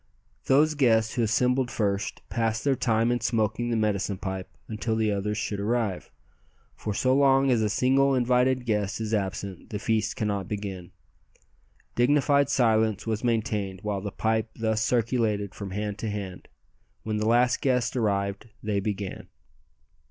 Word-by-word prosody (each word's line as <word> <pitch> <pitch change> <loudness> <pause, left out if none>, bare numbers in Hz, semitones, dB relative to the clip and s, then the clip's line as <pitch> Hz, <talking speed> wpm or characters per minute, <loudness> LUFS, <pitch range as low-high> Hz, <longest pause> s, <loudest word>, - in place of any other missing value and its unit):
Those 150 +3 +4
guests 115 -6 +3
who 125 - 0
assembled 125 +3 +2
first 100 -3 -2
passed 115 -1 -1
their 140 -2 +2
time 115 -1 +1
in 120 - 0
smoking 115 +1 0
the 120 - 0
medicine 105 -2 0
pipe 95 -1 -5 0.2
until 110 +1 -2
the 110 -1 +1
others 105 +1 -2
should 105 -1 -3
arrive, 110 -2 -1 0.7
for 105 - -4
so 130 +5 +2
long 135 -1 +4
as 120 -3 +3
a 105 - +1
single 135 +4 +3
invited 125 0 +2
guest 105 -2 -1
is 110 0 -3
absent 95 -2 -3
the 105 - -3
feast 110 +1 0
cannot 100 -3 -2
begin. 100 -4 -5 1.0
Dignified 140 +2 +3
silence 110 -5 +2
was 110 0 -2
maintained 105 -5 -1
while 105 -2 -2
the 100 - -4
pipe 110 +1 0
thus 110 -1 0
circulated 110 -4 0
from 100 0 -6
hand 105 +1 -4
to 110 - -3
hand. 100 -3 -6 0.6
When 110 -1 -2
the 105 +1 0
last 120 +1 +3
guest 125 -3 +1
arrived 100 -2 -1
they 105 -2 0
began. 100 -1 -4
110 Hz, 155 wpm, -26 LUFS, 105-120 Hz, 1.0 s, Those